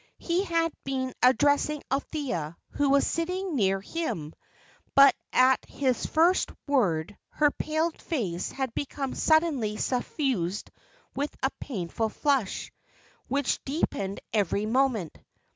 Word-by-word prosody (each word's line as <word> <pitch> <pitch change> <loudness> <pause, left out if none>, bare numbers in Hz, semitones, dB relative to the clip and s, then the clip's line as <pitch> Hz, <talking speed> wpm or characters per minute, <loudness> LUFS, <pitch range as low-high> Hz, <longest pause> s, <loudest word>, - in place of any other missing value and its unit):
He 350 +2 0
had 330 -3 +1
been 260 -1 -2
addressing 285 +4 +3
Althea, 260 - -2
who 285 -1 +1
was 280 0 +4
sitting 360 +1 -2
near 195 -5 +2
him; 195 - -4 0.6
but 275 0 +9 0.2
at 255 +1 +4
his 260 -3 -1
first 340 +4 +3 0.2
word, 205 - +1
her 295 -1 +2
pale 315 +3 -1
face 205 - -3
had 265 -3 -3
become 275 -1 -3
suddenly 300 -10 +2
suffused 245 - -1 0.4
with 285 +2 -3
a 265 - +2
painful 220 -2 -3
flush, 270 -4 0 0.6
which 280 -1 0
deepened 200 - -2
every 205 -1 +1
moment. 230 - 0
270 Hz, 115 wpm, -27 LUFS, 210-300 Hz, 0.6 s, but